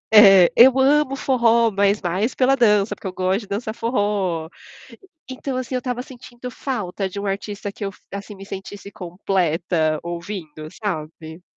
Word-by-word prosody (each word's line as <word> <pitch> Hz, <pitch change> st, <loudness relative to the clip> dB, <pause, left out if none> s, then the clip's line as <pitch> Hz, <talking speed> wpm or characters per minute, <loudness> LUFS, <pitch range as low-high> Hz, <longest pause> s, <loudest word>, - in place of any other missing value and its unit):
É, 195 Hz, -4 st, +9 dB
eu 260 Hz, +2 st, +7 dB
amo 275 Hz, +1 st, +3 dB
forró, 235 Hz, -4 st, +3 dB
mas 200 Hz, +1 st, +2 dB
mais 190 Hz, +6 st, -1 dB
pela 270 Hz, +1 st, +3 dB
dança, 210 Hz, -4 st, +3 dB
porque -, -, -8 dB
eu -, -, -3 dB
gosto 185 Hz, +2 st, 0 dB
de 205 Hz, -, -12 dB
dançar 215 Hz, +2 st, -3 dB
forró. 205 Hz, -8 st, -1 dB, 0.8 s
Então, 260 Hz, 0 st, -4 dB
assim, 255 Hz, 0 st, -4 dB
eu -, -, +1 dB
estava 250 Hz, 0 st, -3 dB
sentindo 250 Hz, -1 st, -10 dB
falta 205 Hz, -8 st, -3 dB
de 195 Hz, -, -8 dB
um 200 Hz, -, -4 dB
artista 200 Hz, +1 st, -4 dB
que -, -, -13 dB
eu, -, -, -3 dB, 0.2 s
assim, 200 Hz, +1 st, -7 dB
me 195 Hz, -, -10 dB
sentisse 200 Hz, +1 st, -9 dB
completa 175 Hz, -4 st, -1 dB
ouvindo, 170 Hz, -3 st, -7 dB, 0.2 s
sabe? 160 Hz, -2 st, -5 dB
200 Hz, 160 wpm, -21 LUFS, 185-240 Hz, 0.8 s, É